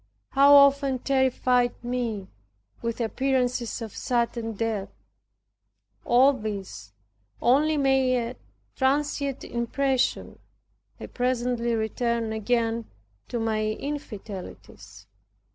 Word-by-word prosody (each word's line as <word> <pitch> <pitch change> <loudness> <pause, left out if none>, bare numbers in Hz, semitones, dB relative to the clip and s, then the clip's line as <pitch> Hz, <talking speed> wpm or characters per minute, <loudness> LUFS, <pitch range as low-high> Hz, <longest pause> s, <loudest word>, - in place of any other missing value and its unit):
How 280 +1 +7
often 280 -1 +5
terrified 255 -2 +1
me 240 -5 -3 0.5
with 230 0 -3
appearances 250 0 -1
of 220 - -8
sudden 235 -2 -1
death! 220 -2 -2 1.2
All 260 +4 +5
these 195 - -6 0.5
only 300 +5 +3
made 265 -2 +3
a - - -11 0.4
transient 280 0 0
impression. 260 +2 -1 0.6
I - - -6
presently 245 -1 -1
returned 225 0 -1
again 230 +1 -1 0.4
to 240 - -3
my 220 -1 0
infidelities. 205 - -7
245 Hz, 90 wpm, -26 LUFS, 225-265 Hz, 1.2 s, How